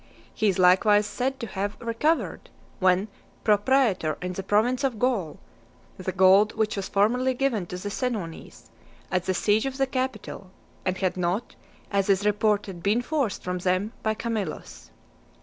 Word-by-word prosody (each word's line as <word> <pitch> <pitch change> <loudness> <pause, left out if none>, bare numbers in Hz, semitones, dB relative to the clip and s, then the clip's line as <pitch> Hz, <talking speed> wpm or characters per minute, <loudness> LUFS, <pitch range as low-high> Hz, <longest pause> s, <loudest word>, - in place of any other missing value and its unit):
He 220 - 0
is 190 - 0
likewise 190 +3 +5
said 265 +5 -2
to - - -2
have 200 0 -4
recovered, 240 +8 -1 0.3
when 185 +2 +3 0.4
pro 210 - +5
praetor 210 - +2
in 180 0 -4
the 195 - -4
province 220 +7 +1
of 260 -5 0
Gaul, 225 -10 0 0.6
the - - -4
gold 190 +3 +5
which 220 -1 0
was 195 -2 -4
formerly 250 +6 +2
given 245 -9 0
to 180 - -6
the 200 +3 -5
Senones, 195 - -5 0.4
at 185 -1 0
the 185 - 0
siege 210 +6 +2
of 265 0 -5
the 270 - +2
Capitol, 255 -7 -4 0.4
and 185 0 0
had 185 -2 -1
not, 180 +6 -1 0.4
as 200 -1 +1
is 195 +1 +3
reported, 210 -3 0
been 210 +6 +1
forced 275 -8 -1
from 180 0 -3
them 185 +5 0
by 220 0 0
Camillus. 155 - -5
205 Hz, 165 wpm, -26 LUFS, 185-235 Hz, 0.6 s, likewise